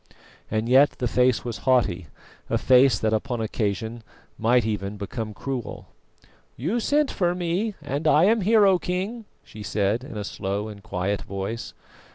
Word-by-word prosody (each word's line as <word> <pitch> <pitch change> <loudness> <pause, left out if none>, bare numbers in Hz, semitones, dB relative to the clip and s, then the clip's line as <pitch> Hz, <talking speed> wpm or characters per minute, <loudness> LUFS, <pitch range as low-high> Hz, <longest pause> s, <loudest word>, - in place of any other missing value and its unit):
And 110 +1 -1
yet 135 +4 +5
the 125 - -1
face 125 0 +2
was 120 -3 -4
haughty, 115 - +1 0.4
a - - +2
face 130 0 +5
that 110 0 0
upon 120 +2 -1
occasion 110 +1 -2 0.3
might 120 +1 +2
even 105 -1 -3
become 110 +2 -5
cruel. 130 -5 -5 0.7
"You 175 - -1
sent 290 +5 +1
for 175 -1 0
me 180 +5 -1
and 145 +2 -2
I 155 +1 +5
am 220 +3 +4
here, 210 +2 +5
O 190 -2 +4
King," 195 +7 -3 0.2
she 105 - -12
said, 105 +3 0
in 135 -5 -8
a 105 - -3
slow 100 +1 -3
and 100 -1 -10
quiet 100 -1 -2
voice. 100 +4 -5
120 Hz, 165 wpm, -24 LUFS, 105-165 Hz, 0.7 s, yet